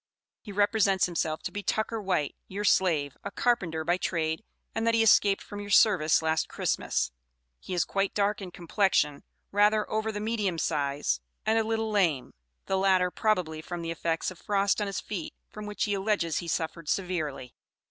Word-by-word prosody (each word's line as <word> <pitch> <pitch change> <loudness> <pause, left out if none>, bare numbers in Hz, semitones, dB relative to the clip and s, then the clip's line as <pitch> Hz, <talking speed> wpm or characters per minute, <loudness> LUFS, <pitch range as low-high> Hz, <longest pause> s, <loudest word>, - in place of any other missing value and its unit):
He 210 - -9
represents 205 -1 +3
himself 165 -3 -2
to - - -3
be 205 - -4
Tucker 220 +2 -1
White, 185 -7 0
your 200 +2 -4
slave, 160 -9 +2
a - - -3
carpenter 180 -10 0
by 175 +3 +1
trade, 160 0 -1 0.3
and 225 +1 -1
that 230 - +4
he 225 - +4
escaped 205 -2 +4
from 205 - -8
your 205 - -7
service 180 -7 +5
last 160 0 +1
Christmas. - - -1 0.5
He 180 - -5
is 175 - +2
quite 195 0 -1
dark 205 0 +1
in 190 - -6
complexion, 175 -4 +1 0.3
rather 210 +1 +3
over 220 0 0
the 210 - -4
medium 210 -5 -1
size, 140 - 0 0.3
and 220 +1 +3
a - - +2
little 225 0 -1
lame; 170 -11 +1 0.3
the 190 - 0
latter, 185 -2 +3
probably, 180 -8 0
from 175 +1 -6
the 165 - -3
effects 165 +1 -1
of 185 - -12
frost 200 0 +1
on 205 - 0
his 195 - -3
feet, 185 -7 -6 0.2
from 210 0 -7
which, 210 - -2
he 205 - 0
alleges, 195 -5 0
he 175 - -7
suffered 165 -1 -3
severely. 155 -9 -2
190 Hz, 185 wpm, -28 LUFS, 165-210 Hz, 0.5 s, service